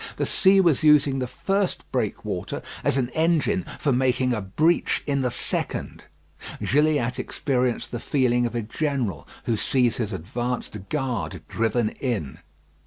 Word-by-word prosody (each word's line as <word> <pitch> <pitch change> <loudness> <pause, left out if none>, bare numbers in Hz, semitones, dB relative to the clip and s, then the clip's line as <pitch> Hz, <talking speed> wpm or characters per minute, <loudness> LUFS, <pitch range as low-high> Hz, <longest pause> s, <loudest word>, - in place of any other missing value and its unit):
The - - 0
sea 195 0 +5
was 170 -7 +4
using 145 -3 +5
the 125 - -2
first 195 +7 -1
breakwater - - -3 0.2
as - - +2
an 125 -2 0
engine 170 +5 +1
for 145 - 0
making 125 0 +2
a 110 - -1
breach 155 - +1
in 140 -1 0
the 125 - +1
second. - - -3 0.5
Gilliatt 145 -4 +2
experienced 130 -3 -1
the 120 - -3
feeling 120 -3 +1
of 120 - -7
a 120 - -1
general 115 - -2 0.2
who 115 - 0
sees 120 +1 +1
his 115 -3 -2
advanced 105 +2 -4
guard 125 - -2
driven 115 0 0
in. 105 - -3
125 Hz, 145 wpm, -24 LUFS, 115-150 Hz, 0.5 s, sea